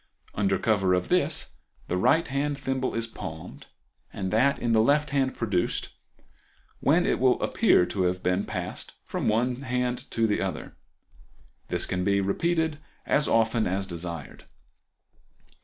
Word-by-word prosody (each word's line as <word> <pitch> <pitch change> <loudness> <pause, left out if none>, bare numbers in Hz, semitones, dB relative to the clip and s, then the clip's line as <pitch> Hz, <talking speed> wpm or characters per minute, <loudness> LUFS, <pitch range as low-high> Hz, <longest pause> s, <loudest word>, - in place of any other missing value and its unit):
Under 95 -2 +1
cover 95 -3 +2
of 90 0 -2
this - - +1 0.4
the - - -1
right 125 - +3
hand 140 +1 -1
thimble 135 -1 -2
is 115 0 -1
palmed, 115 - -9 0.4
and 95 -1 -4
that 130 +6 +3
in 120 - -1
the 110 -1 +5
left 145 +5 +2
hand 135 -2 +1
produced, 100 -6 -1 0.9
when - - +3
it - - +1
will - - +3
appear 90 - +3
to 95 - -3
have 90 +1 -1
been 90 +2 +1
passed 90 -3 -5
from - - -3
one 120 +3 +1
hand 125 -2 -2
to 115 - +1
the 105 -2 +1
other. - - -4 0.9
This - - -1
can 90 0 -2
be 100 +1 +2
repeated 160 - 0 0.3
as 150 - +2
often 115 0 +2
as 95 +2 -1
desired. 85 -4 -7
110 Hz, 150 wpm, -27 LUFS, 95-130 Hz, 0.9 s, the